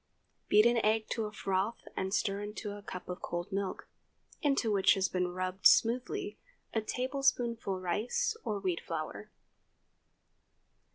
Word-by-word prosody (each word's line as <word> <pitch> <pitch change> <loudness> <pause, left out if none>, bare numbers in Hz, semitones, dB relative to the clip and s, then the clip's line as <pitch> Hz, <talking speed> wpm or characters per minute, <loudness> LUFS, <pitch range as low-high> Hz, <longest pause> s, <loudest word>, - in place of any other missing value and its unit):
Beat 210 +1 +6
an 235 -1 +4
egg 220 +1 +2
to 225 -2 0
a 210 - -5
froth 195 +1 -2
and 190 0 -2
stir 200 -1 0
into 210 0 -5
a 205 0 -7
cup 180 -2 -7
of 180 - -5
cold 175 +3 -4
milk, 195 -1 -3 0.5
into 275 -6 +2
which 195 -2 +5
has 190 -1 +1
been 180 -1 0
rubbed 185 +1 +2
smoothly 255 - +2 0.3
a 220 - +1
tablespoonful 245 -5 0
rice 230 - 0
or 210 - -1
wheat 185 -3 -1
flour. 155 -11 -5
205 Hz, 145 wpm, -32 LUFS, 185-235 Hz, 0.5 s, Beat